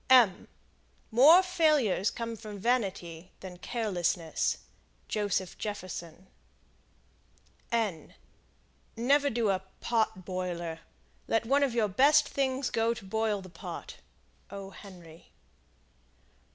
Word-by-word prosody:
More 300 Hz, +11 st, +8 dB
failures 305 Hz, -, +2 dB
come 230 Hz, -1 st, -5 dB
from 215 Hz, -2 st, -9 dB
vanity 190 Hz, -7 st, -1 dB
than 185 Hz, -2 st, -8 dB
carelessness. 180 Hz, -7 st, -1 dB, 0.5 s
Joseph 205 Hz, -3 st, -2 dB
Jefferson. 185 Hz, -4 st, -6 dB, 2.7 s
Never 280 Hz, +5 st, +3 dB
do 230 Hz, -4 st, +1 dB
a 185 Hz, -1 st, -1 dB, 0.2 s
"pot 220 Hz, -5 st, 0 dB
boiler." 175 Hz, -3 st, -4 dB, 0.5 s
Let 225 Hz, 0 st, +1 dB
one 275 Hz, +4 st, +3 dB
of 270 Hz, -4 st, +1 dB
your 225 Hz, -3 st, +3 dB
best 285 Hz, +9 st, +5 dB
things 265 Hz, -1 st, -1 dB
go 230 Hz, +1 st, +1 dB
to 200 Hz, -, -10 dB
boil 215 Hz, 0 st, -1 dB
the 185 Hz, -, -11 dB
pot. 170 Hz, -, -8 dB, 0.5 s
"O. 195 Hz, -1 st, -8 dB
Henry." 175 Hz, -5 st, -13 dB
210 Hz, 100 wpm, -30 LUFS, 185-240 Hz, 2.7 s, More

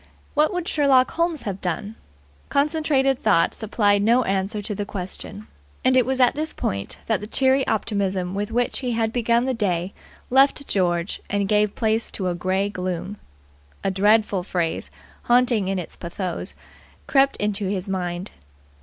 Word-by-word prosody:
What 300 Hz, +1 st, +3 dB
would 360 Hz, -2 st, -3 dB
Sherlock 270 Hz, -4 st, +4 dB
Holmes 335 Hz, -2 st, -1 dB
have 195 Hz, -2 st, -4 dB
done? 185 Hz, +4 st, -3 dB, 0.6 s
Concentrated 280 Hz, -3 st, +1 dB
thought 165 Hz, -, +3 dB
supplied 205 Hz, -2 st, +1 dB
no 235 Hz, +4 st, +4 dB
answer 195 Hz, +1 st, -1 dB
to 205 Hz, +1 st, -4 dB
the 205 Hz, -, -3 dB
question; 200 Hz, +1 st, -7 dB, 0.4 s
and 255 Hz, 0 st, +4 dB
it 255 Hz, -2 st, +4 dB
was 265 Hz, 0 st, 0 dB
at 250 Hz, -2 st, +5 dB
this 310 Hz, +3 st, -3 dB
point 100 Hz, 0 st, -3 dB
that 220 Hz, -4 st, +1 dB
the 210 Hz, -, -6 dB
cheery 265 Hz, +3 st, +2 dB
optimism 195 Hz, -4 st, -1 dB
with 205 Hz, +2 st, -2 dB
which 240 Hz, +2 st, 0 dB
he 250 Hz, -3 st, -2 dB
had 225 Hz, -1 st, 0 dB
begun 235 Hz, 0 st, +2 dB
the 260 Hz, -, 0 dB
day 185 Hz, -5 st, -1 dB, 0.4 s
left 275 Hz, +2 st, +4 dB
George 175 Hz, -1 st, 0 dB
and 200 Hz, -1 st, 0 dB
gave 210 Hz, 0 st, +2 dB
place 220 Hz, 0 st, 0 dB
to 185 Hz, -2 st, -3 dB
a -, -, -1 dB
grey 185 Hz, +3 st, 0 dB
gloom. 185 Hz, +1 st, -4 dB, 0.7 s
A 195 Hz, -, +1 dB
dreadful 205 Hz, 0 st, +3 dB
phrase, 175 Hz, -2 st, -2 dB, 0.4 s
haunting 240 Hz, -4 st, +3 dB
in 195 Hz, 0 st, -1 dB
its 180 Hz, -, -6 dB
pathos, 175 Hz, +1 st, -5 dB, 0.5 s
crept 275 Hz, 0 st, +3 dB
into 205 Hz, -1 st, -1 dB
his 190 Hz, 0 st, -3 dB
mind. 180 Hz, -1 st, -3 dB
210 Hz, 165 wpm, -23 LUFS, 190-255 Hz, 0.7 s, at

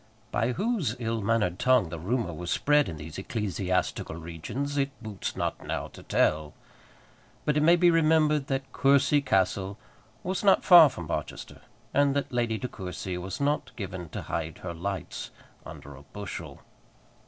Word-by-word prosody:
By 115 Hz, +3 st, +1 dB
whose 210 Hz, -, -1 dB
ill 115 Hz, -2 st, -2 dB
mannered 100 Hz, -4 st, +1 dB
tongue 125 Hz, -9 st, +3 dB
the 85 Hz, 0 st, -6 dB
rumour 105 Hz, +1 st, -1 dB
was 85 Hz, +2 st, -6 dB
spread 150 Hz, -7 st, +3 dB
in 80 Hz, -, -6 dB
these 75 Hz, +3 st, -8 dB
ecclesiastical 95 Hz, -5 st, -2 dB
regions 85 Hz, -, -5 dB
it 140 Hz, -1 st, +1 dB
boots 110 Hz, -4 st, -5 dB
not -, -, -3 dB
now -, -, -3 dB
to -, -, -13 dB
tell. 75 Hz, -1 st, +1 dB, 0.9 s
But 150 Hz, -, +2 dB
it 150 Hz, -, +3 dB
may 165 Hz, +3 st, +6 dB
be 175 Hz, 0 st, +5 dB
remembered 155 Hz, -3 st, +3 dB
that 135 Hz, -1 st, -3 dB
Courcy 140 Hz, +1 st, +4 dB
Castle 95 Hz, -4 st, 0 dB, 0.5 s
was 185 Hz, +2 st, -2 dB
not 195 Hz, -2 st, +5 dB
far 170 Hz, -5 st, +10 dB
from 85 Hz, -, -7 dB
Barchester, -, -, -5 dB, 0.3 s
and 140 Hz, -1 st, +3 dB
that 140 Hz, 0 st, -1 dB
Lady 120 Hz, -2 st, 0 dB
De 125 Hz, -, -4 dB
Courcy 95 Hz, -3 st, -6 dB
was 95 Hz, +2 st, -5 dB
not 145 Hz, +1 st, -1 dB
given 95 Hz, -5 st, -6 dB
to -, -, -6 dB
hide 80 Hz, -1 st, -4 dB
her 85 Hz, -2 st, -4 dB
lights 95 Hz, +1 st, -5 dB, 0.4 s
under 70 Hz, -, -10 dB
a 65 Hz, -, -13 dB
bushel. 80 Hz, -3 st, -8 dB
115 Hz, 165 wpm, -28 LUFS, 90-140 Hz, 0.9 s, far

